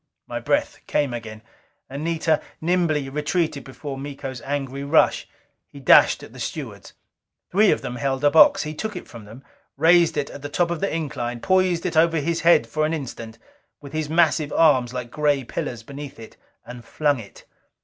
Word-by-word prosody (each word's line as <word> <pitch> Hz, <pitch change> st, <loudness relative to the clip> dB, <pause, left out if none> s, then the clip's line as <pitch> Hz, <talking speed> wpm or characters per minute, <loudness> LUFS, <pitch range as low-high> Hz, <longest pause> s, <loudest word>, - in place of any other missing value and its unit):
My -, -, -5 dB
breath -, -, -1 dB
came 140 Hz, -4 st, 0 dB
again; 110 Hz, -2 st, -7 dB, 0.4 s
Anita 155 Hz, +3 st, -1 dB, 0.2 s
nimbly 160 Hz, -4 st, 0 dB
retreated 150 Hz, +1 st, -1 dB
before 135 Hz, 0 st, -8 dB
Miko's 135 Hz, -3 st, -7 dB
angry 140 Hz, -1 st, -4 dB
rush. 145 Hz, +3 st, +2 dB, 0.4 s
He 140 Hz, -, -13 dB
dashed 135 Hz, -, +5 dB
at -, -, -12 dB
the -, -, -12 dB
stewards. -, -, -6 dB, 0.6 s
Three 205 Hz, +3 st, +4 dB
of -, -, +2 dB
them 125 Hz, -, -5 dB
held 135 Hz, +2 st, -2 dB
a 145 Hz, -, +5 dB
box. 160 Hz, -, +6 dB
He 155 Hz, 0 st, -5 dB
took 215 Hz, +6 st, -5 dB
it 180 Hz, -, -7 dB
from 115 Hz, -3 st, -11 dB
them; 115 Hz, +6 st, -13 dB, 0.3 s
raised 170 Hz, +3 st, +4 dB
it 145 Hz, -1 st, -2 dB
at 145 Hz, -, -10 dB
the 145 Hz, -, -6 dB
top 170 Hz, +3 st, 0 dB
of 170 Hz, -, -2 dB
the 195 Hz, -, -1 dB
incline, 130 Hz, -7 st, -3 dB
poised 185 Hz, +1 st, +1 dB
it 175 Hz, -, -2 dB
over 165 Hz, +1 st, +4 dB
his 165 Hz, +2 st, -1 dB
head 170 Hz, +2 st, +4 dB
an 155 Hz, +1 st, +1 dB
instant, 115 Hz, -6 st, -7 dB, 0.4 s
with 140 Hz, -1 st, -12 dB
his 155 Hz, -1 st, -2 dB
massive 160 Hz, -2 st, +2 dB
arms 130 Hz, -7 st, +3 dB
like 125 Hz, -2 st, -6 dB
gray 145 Hz, -3 st, +1 dB
pillars 120 Hz, -1 st, -5 dB
beneath 140 Hz, +1 st, -9 dB
it; 110 Hz, -, -12 dB, 0.3 s
and 125 Hz, -1 st, -10 dB
flung 145 Hz, -1 st, 0 dB
it. 105 Hz, -, -13 dB
145 Hz, 180 wpm, -23 LUFS, 130-165 Hz, 0.6 s, box